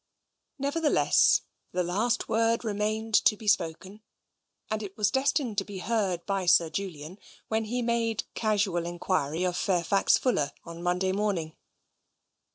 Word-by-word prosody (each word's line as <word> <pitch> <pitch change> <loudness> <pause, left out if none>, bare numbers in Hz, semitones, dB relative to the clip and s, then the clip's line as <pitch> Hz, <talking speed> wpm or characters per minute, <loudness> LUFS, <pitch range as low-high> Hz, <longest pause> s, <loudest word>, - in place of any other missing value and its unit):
XX - - -54
Nevertheless 300 +2 +3 0.3
the 180 0 +1
last 215 +8 0
word 230 +1 +1
remained 215 +1 -2
to 230 -4 +4
be 215 - -10
spoken, 190 +3 0 0.7
and 215 0 -1
it 200 -1 -8
was 205 -2 +2
destined 265 -5 +1
to - - -3
be 200 0 -8
heard 195 -4 -1
by 195 -2 -2
Sir 165 -2 +5
Julian 180 -1 -6 0.3
when 220 0 0
he 245 +3 -2
made 230 -2 0
casual 200 -6 0
enquiry 175 -2 -1
of 180 -1 0
Fairfax 190 +2 +2
Fuller 190 - 0
on 170 0 -9
Monday 180 +2 0
morning. 190 -6 -2
200 Hz, 145 wpm, -28 LUFS, 180-225 Hz, 0.7 s, Sir